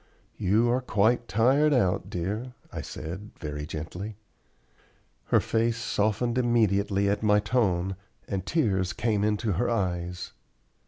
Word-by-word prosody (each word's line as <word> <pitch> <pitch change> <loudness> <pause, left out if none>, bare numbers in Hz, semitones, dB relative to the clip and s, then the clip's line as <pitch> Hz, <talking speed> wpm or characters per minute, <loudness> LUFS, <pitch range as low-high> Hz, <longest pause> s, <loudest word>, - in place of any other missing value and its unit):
"You 105 +5 +3
are 125 +2 +1
quite 120 +1 +2
tired 135 +8 +3
out, 95 -6 +1
dear," 105 +9 -3 0.2
I - - -4
said, 95 +7 -7
very 75 -2 -5
gently. 90 +7 -6 1.1
Her - - +4
face 115 0 0
softened 115 +2 0
immediately 100 -4 +2
at 100 +1 +1
my 105 -1 +4
tone 95 -5 +1 0.3
and 95 -3 -2
tears 95 - +1
came 110 -3 0
into 105 +1 +1
her 100 +7 0
eyes. 90 -5 -2
105 Hz, 125 wpm, -27 LUFS, 95-120 Hz, 1.1 s, Her